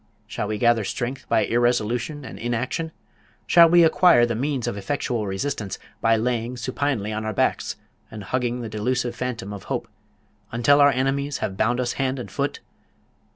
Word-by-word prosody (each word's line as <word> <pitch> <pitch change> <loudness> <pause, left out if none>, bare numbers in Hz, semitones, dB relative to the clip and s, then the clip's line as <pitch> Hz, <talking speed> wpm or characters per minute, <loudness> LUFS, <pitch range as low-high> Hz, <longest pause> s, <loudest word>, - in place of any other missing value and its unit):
Shall 105 - -4
we 105 0 -2
gather 120 -1 +3
strength 125 +6 -4
by - - +3
irresolution 120 +4 0
and - - -9
inaction? 120 +7 -2 0.5
Shall 170 -1 +7
we 170 0 +6
acquire 165 -5 +5
the 120 - -2
means 130 +1 -1
of - - -2
effectual 110 +1 -2
resistance, 100 0 -3 0.2
by 115 0 +4
lying 120 +1 -1
supinely 125 -3 -2
on 110 0 -3
our 110 0 -2
backs, - - 0 0.3
and 105 -2 -8
hugging 125 +2 -1
the 115 - -5
delusive 120 +3 -1
phantom 120 -6 -4
of 100 - -9
hope, 125 -3 -3 0.6
until 135 +5 +4
our 145 - +7
enemies 140 +1 0
have 95 - -3
bound 120 +5 +1
us 125 -1 -1
hand 135 0 0
and 125 - -7
foot? - - -2
120 Hz, 170 wpm, -23 LUFS, 110-135 Hz, 0.6 s, Shall